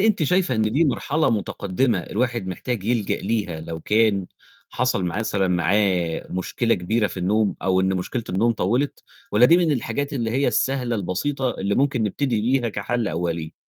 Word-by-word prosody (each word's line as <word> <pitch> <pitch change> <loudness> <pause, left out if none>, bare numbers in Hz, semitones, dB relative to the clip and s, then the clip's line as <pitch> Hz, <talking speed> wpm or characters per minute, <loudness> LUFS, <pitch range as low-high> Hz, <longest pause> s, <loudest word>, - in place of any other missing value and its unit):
أنتِ 210 -4 +2
شايفة 180 -3 +2
إن 110 - +1
دي 160 +6 +3
مرحلة 150 +3 +1
متقدمة 105 +2 0
الواحد 120 -3 -2
محتاج 100 +3 -4
يلجأ 115 -3 0
ليها 100 -8 -2
لو 80 0 -6
كان 105 -1 +2 0.4
حصل 125 -7 0
مثلًا 100 +1 -1
معاه 90 -1 +1
مشكلة 115 +6 0
كبيرة 105 +5 0
في 95 - -8
النوم، 100 +3 +1
أو 95 -1 +2
إن 95 0 +1
مشكلة 115 +6 -3
النوم 115 +6 +2
طوِّلت؟ 120 +8 -1 0.3
والّا 120 +4 +6
دي 170 - +6
من 170 -4 +2
الحاجات 140 +3 -2
اللي 115 -5 -1
هي 135 +4 +1
السهلة 130 -3 0
البسيطة 125 +8 -1
اللي 100 -2 -2
ممكن 135 -4 +1
نبتدي 115 +2 0
بيها 120 +1 +1
كَحَل 110 +2 -2
أولِي؟ 85 -1 -3
110 Hz, 165 wpm, -23 LUFS, 95-125 Hz, 0.4 s, والّا